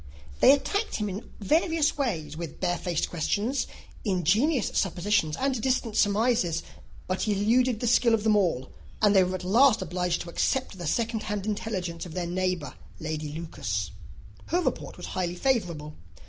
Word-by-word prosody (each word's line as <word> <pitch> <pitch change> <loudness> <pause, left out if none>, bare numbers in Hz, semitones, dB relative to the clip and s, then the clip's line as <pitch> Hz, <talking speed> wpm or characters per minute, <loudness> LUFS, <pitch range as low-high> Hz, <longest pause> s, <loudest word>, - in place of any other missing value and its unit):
They - - +8
attacked 400 +10 +1
him 210 -1 -1
in 195 +4 -6
various 315 - +2
ways, 165 - -2
with 165 -2 -7
barefaced 175 -2 0
questions, 205 - 0 0.4
ingenious 210 - +2
suppositions, 180 -4 +1
and 265 -3 0
distant 245 -3 0
surmises; 205 -6 +2 0.4
but 185 0 -2
he 210 - +1
eluded 230 +3 +2
the - - 0
skill 235 0 +4
of 215 - -3
them 220 -1 +4
all; 170 -10 +1 0.3
and 210 -1 +4
they 190 - +7
were 185 +1 -1
at 185 - -5
last 240 +9 +5
obliged 180 -1 -1
to 170 - -7
accept 255 -1 -1
the 175 - -4
second 225 +6 0
hand 205 -2 -3
intelligence 185 -5 -3
of 160 - -10
their 180 -1 -1
neighbour, 180 -3 -1 0.3
Lady 155 -1 -3
Lucas. 160 +1 -3 0.6
Her 355 - +1
report - - -3
was - - -7
highly 175 -1 -2
favourable. 175 - -1
200 Hz, 160 wpm, -27 LUFS, 175-235 Hz, 0.6 s, They